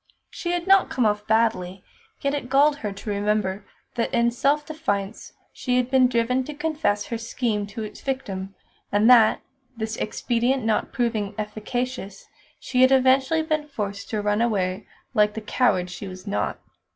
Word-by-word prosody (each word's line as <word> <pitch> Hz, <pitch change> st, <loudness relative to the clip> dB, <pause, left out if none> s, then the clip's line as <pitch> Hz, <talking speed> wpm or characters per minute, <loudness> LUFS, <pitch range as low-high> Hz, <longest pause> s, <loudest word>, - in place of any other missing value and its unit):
She 345 Hz, -, -4 dB
had 350 Hz, -1 st, -2 dB
not 390 Hz, 0 st, +5 dB
come 250 Hz, -, 0 dB
off 210 Hz, 0 st, 0 dB
badly, 220 Hz, -5 st, +1 dB, 0.4 s
yet 280 Hz, 0 st, 0 dB
it 280 Hz, -4 st, -4 dB
galled 285 Hz, +2 st, +4 dB
her 210 Hz, -6 st, -4 dB
to 200 Hz, +2 st, -8 dB
remember 205 Hz, -1 st, -1 dB, 0.3 s
that 235 Hz, -, -1 dB
in 235 Hz, 0 st, +2 dB
self 285 Hz, +5 st, +1 dB
defence 225 Hz, -11 st, -3 dB, 0.2 s
she 250 Hz, -1 st, -1 dB
had 250 Hz, 0 st, 0 dB
been 260 Hz, -1 st, +5 dB
driven 250 Hz, +1 st, +1 dB
to 300 Hz, -, -7 dB
confess 300 Hz, -9 st, -1 dB
her 230 Hz, -, -4 dB
scheme 225 Hz, -3 st, -2 dB
to 210 Hz, +2 st, -6 dB
its 215 Hz, -, -8 dB
victim, 195 Hz, -8 st, -4 dB, 0.4 s
and 205 Hz, +2 st, +3 dB
that 225 Hz, -3 st, +6 dB, 0.4 s
this 220 Hz, 0 st, -3 dB
expedient 240 Hz, +3 st, 0 dB
not 220 Hz, -1 st, 0 dB
proving 220 Hz, -4 st, -1 dB
efficacious 215 Hz, 0 st, -4 dB, 0.3 s
she 255 Hz, -1 st, 0 dB
had 260 Hz, +1 st, +6 dB
eventually 265 Hz, +4 st, +4 dB
been 310 Hz, -1 st, -1 dB
forced 205 Hz, -8 st, -5 dB
to 215 Hz, -2 st, -2 dB
run 210 Hz, +1 st, +1 dB
away 195 Hz, -4 st, 0 dB, 0.3 s
like 210 Hz, 0 st, +3 dB
the -, -, -2 dB
coward 195 Hz, -5 st, +1 dB
she 185 Hz, +3 st, -7 dB
was 185 Hz, 0 st, -9 dB
not. 105 Hz, -2 st, -2 dB
230 Hz, 170 wpm, -24 LUFS, 205-260 Hz, 0.4 s, that